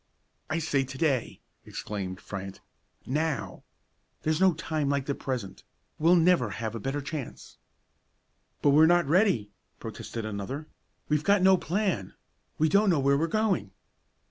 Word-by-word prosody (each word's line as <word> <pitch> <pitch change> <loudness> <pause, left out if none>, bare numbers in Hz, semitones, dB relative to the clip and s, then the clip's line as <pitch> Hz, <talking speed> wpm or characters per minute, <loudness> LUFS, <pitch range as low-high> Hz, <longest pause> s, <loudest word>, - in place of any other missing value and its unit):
"I 155 - 0
say 145 -4 +1
to 135 0 -8
day!" 135 -5 0 0.2
exclaimed 95 -3 -5
Fryant, 95 -1 -7 0.5
"now! 150 +2 -2 0.6
There's 155 +2 0
no 190 -3 +5
time 155 -3 -2
like 140 -1 0
the 140 - -1
present; 120 -9 -5 0.4
we'll 165 +3 +5
never 170 -8 +4
have 110 +1 -4
a 115 - -4
better 135 +6 -2
chance." 145 -2 -7 1.0
"But 145 - +5
we're 155 +3 +7
not 175 +1 +4
ready," 150 - +2 0.3
protested 115 -2 -6
another; 110 +8 -5 0.4
"we've 150 0 +1
got 200 0 +3
no 190 0 +7
plan; 180 - -2 0.4
we 160 - +3
don't 200 +5 +4
know 165 -5 +3
where 140 +1 +3
we're 160 +4 +1
going!" 190 - 0
145 Hz, 145 wpm, -28 LUFS, 120-170 Hz, 1.0 s, we're